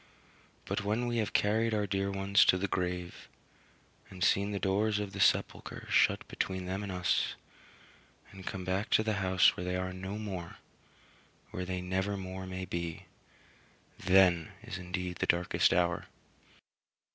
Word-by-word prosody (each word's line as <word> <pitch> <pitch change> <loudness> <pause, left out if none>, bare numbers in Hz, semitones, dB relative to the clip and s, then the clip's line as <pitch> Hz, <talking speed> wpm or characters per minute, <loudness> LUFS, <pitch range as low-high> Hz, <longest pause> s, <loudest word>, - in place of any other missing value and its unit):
But - - -2
when 110 +4 0
we 120 -1 -1
have 110 -2 0
carried 110 +2 +2
our 105 -1 +1
dear 100 0 -1
ones 100 0 +4
to 95 - +5
the 100 +2 -1
grave, 90 -2 -3 0.8
and 90 -1 -5
seen 100 +1 +3
the 100 - -2
doors 100 +2 +1
of 105 -1 -4
the 100 - -6
sepulchre 95 - +1
shut - - +3
between 95 -1 -3
them 95 +2 -3
and 100 -2 -5
us, 90 0 0 1.0
and 95 -1 -11
come 95 -1 -4
back 95 +4 -1
to 110 - +4
the 110 0 0
house 95 -1 +4
where - - -5
they 90 0 -2
are 95 0 -2
no 95 +2 -5
more 95 -6 -6 0.9
where 90 - -4
they 90 0 -3
never 95 +2 -1
more 95 0 -6
may 95 0 -5
be 85 -2 -4 0.9
then 90 -2 +4
is 110 -6 -6
indeed 90 0 -4
the - - -1
darkest 85 +1 +3
hour. 90 0 +1
95 Hz, 160 wpm, -31 LUFS, 90-100 Hz, 1.0 s, to